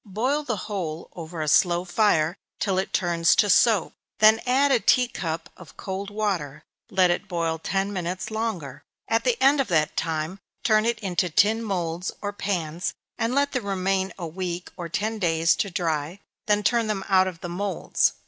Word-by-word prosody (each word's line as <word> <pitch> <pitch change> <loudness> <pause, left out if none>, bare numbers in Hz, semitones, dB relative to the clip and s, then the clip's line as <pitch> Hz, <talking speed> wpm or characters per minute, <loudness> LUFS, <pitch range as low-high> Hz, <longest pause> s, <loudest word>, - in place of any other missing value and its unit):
Boil 265 +7 +1
the 245 -6 -2
whole 170 -7 -5
over 165 -1 -5
a - - -4
slow 175 +3 +3
fire, 175 -4 +2 0.2
till 190 -2 +1
it 190 - -3
turns 170 -2 +2
to 205 - +4
soap, 210 -2 +4 0.2
then 220 +1 +6
add 275 +3 +3
a 255 - +4
tea 250 +4 +4
cup 165 -8 -4
of 180 -3 -15
cold 195 +1 -5
water 180 -9 -2 0.3
let 185 -4 +3
it 180 +4 -2
boil 165 -3 -1
ten 195 +4 -1
minutes 180 +2 -4
longer 215 - -3 0.3
at 225 0 +1
the 245 -1 +1
end 275 +2 +5
of 265 - -2
that 155 -4 +1
time 160 +3 -2 0.2
turn 215 -1 +3
it 235 -1 +1
into 180 -3 0
tin 205 +6 +3
moulds, 180 -4 -2
or 205 0 -4
pans, 175 -4 -2 0.2
and 230 +3 0
let 285 0 +2
them 255 -4 -2
remain 190 -1 0
a 175 - -5
week 175 +1 -5
or 175 -2 -6
ten 215 +5 -2
days 165 -3 +3
to 200 - -1
dry, 165 -1 -2 0.3
then 210 0 +2
turn 230 0 +2
them 205 -3 -2
out 190 -1 +4
of 175 -3 -7
the - - -4
moulds. 190 +1 0
190 Hz, 185 wpm, -25 LUFS, 170-215 Hz, 0.3 s, then